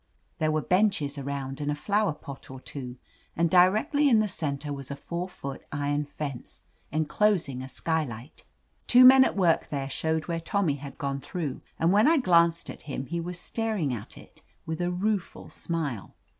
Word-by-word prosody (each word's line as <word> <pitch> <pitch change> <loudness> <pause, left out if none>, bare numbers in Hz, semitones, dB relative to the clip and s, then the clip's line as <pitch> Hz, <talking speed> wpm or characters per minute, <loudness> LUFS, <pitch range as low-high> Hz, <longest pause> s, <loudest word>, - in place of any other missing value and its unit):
There 155 - +2
were 155 -1 0
benches 180 -7 +1
around 135 0 -4
and 145 - -2
a 145 - 0
flower 205 +3 +1
pot 140 -2 -10
or 130 0 -8
two, 130 -2 -7 0.4
and 165 0 +1
directly 215 - +4
in 230 - +5
the 215 - +2
center 145 -5 -3
was 140 -1 -7
a 140 - -4
four 175 +5 -5
foot 140 -6 -7
iron 145 0 -1
fence, 140 -3 -7 0.3
enclosing 155 -2 +1
a 130 - -7
skylight. 135 -3 -3 0.4
Two 250 +1 +8
men 260 +1 +9
at 260 - -1
work 175 -4 +2
there 135 -2 -3
showed 160 +2 -1
where 170 -1 -1
Tommy 165 -3 0
had 140 0 -9
gone 140 -1 -2
through, 150 -3 -4 0.2
and 165 +2 +2
when 210 +5 +5
I 330 +1 +5
glanced 170 - +3
at - - -8
him 135 -1 -3
he 170 +5 -3
was 175 +1 -4
staring 215 - -1
at 105 -3 -7
it - - -16 0.2
with 160 +1 -3
a 175 - 0
rueful 195 +2 -2
smile. 150 - -4
160 Hz, 185 wpm, -27 LUFS, 140-185 Hz, 0.4 s, men